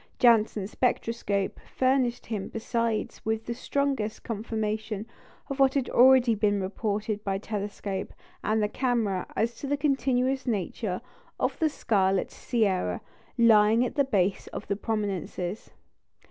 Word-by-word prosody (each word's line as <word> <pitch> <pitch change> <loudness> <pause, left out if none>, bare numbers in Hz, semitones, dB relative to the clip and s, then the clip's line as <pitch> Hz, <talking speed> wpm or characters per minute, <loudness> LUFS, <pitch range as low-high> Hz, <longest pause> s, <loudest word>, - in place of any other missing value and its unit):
Janssen's 220 -4 +3
spectroscope 230 -5 -1
furnished 255 -2 0
him 210 -4 -3
besides 230 0 -2
with 220 0 -1
the 235 - -2
strongest 270 -4 -1
confirmation 215 -1 -3 0.4
of 275 0 -5
what 270 0 +4
had 270 -3 0
already 255 -1 +6
been 205 -1 +1
reported 205 +2 -2
by 195 -1 -1
the 200 - -12
telescope 200 -2 -4 0.3
and 215 0 +1
the - - +2
camera 220 -6 0
as 230 +1 +1
to 280 - -5
the 285 +1 +1
continuous 265 -2 +1
nature 200 -2 -2 0.4
of - - -1
the 315 - +3
scarlet 195 -8 +1
"sierra" 190 - 0 0.4
lying 225 0 +5
at - - -3
the 285 - +3
base 200 -7 0
of - - -7
the 200 - 0
prominences. 200 -3 -3
220 Hz, 135 wpm, -27 LUFS, 205-245 Hz, 0.4 s, already